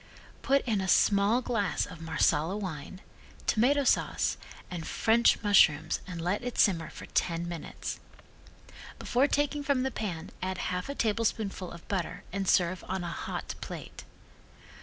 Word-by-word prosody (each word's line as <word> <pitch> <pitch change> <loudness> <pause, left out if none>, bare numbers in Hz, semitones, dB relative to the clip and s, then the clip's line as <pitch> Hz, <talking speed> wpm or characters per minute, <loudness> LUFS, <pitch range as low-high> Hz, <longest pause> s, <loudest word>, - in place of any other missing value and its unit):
Put 275 +1 +2
in 215 -5 +1
a 190 - -2
small 200 +6 +4
glass 215 -6 0
of 175 -3 -11
Marsala 160 +2 +1
wine, 185 -1 -6 0.4
tomato 275 +6 +3
sauce - - +2 0.4
and 170 -3 -5
French 230 +1 +3
mushrooms 195 -8 +4
and 180 -2 -6
let 205 +9 -2
simmer 165 -6 +3
for - - -10
ten 170 0 -1
minutes. 170 -2 -6 1.0
Before 255 +4 +2
taking 290 0 0
from 280 -2 +1
the 265 - -1
pan 185 -9 -4
add 185 0 -2
half 180 +6 -3
a 280 - -3
tablespoonful 215 -5 -1
of 170 0 -12
butter 185 -4 -3
and 195 0 -2
serve 180 0 +2
on 190 0 -2
a 175 - -3
hot - - -4
plate. - - -8
195 Hz, 145 wpm, -29 LUFS, 175-235 Hz, 1.0 s, small